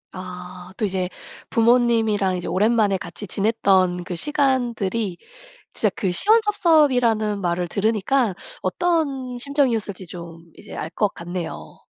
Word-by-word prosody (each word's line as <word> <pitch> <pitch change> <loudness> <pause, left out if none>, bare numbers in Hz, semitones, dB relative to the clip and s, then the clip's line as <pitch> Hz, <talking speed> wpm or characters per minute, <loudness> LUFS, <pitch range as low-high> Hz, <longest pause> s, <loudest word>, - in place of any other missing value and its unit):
아 180 0 -8
또 215 - 0
이제 185 -2 -1 0.4
부모님이랑 225 -5 +3
이제 180 - -5
오랜만에 205 +2 +2
같이 205 - -8
지냈던 190 -4 +2
그 180 +1 -6
시간들이 235 - 0 0.6
진짜 - - +1
그 190 - 0
시원섭섭이라는 290 - +3
말을 175 -1 -1
들으니까 215 +3 +1 0.3
어떤 280 -8 -1
심정이었을지 240 -8 -1
좀 170 -1 -10
이제 - - -11
알 155 - -4
것 210 - +2
같네요. 175 -1 -7
210 Hz, 285 characters per minute, -22 LUFS, 185-245 Hz, 0.6 s, 부모님이랑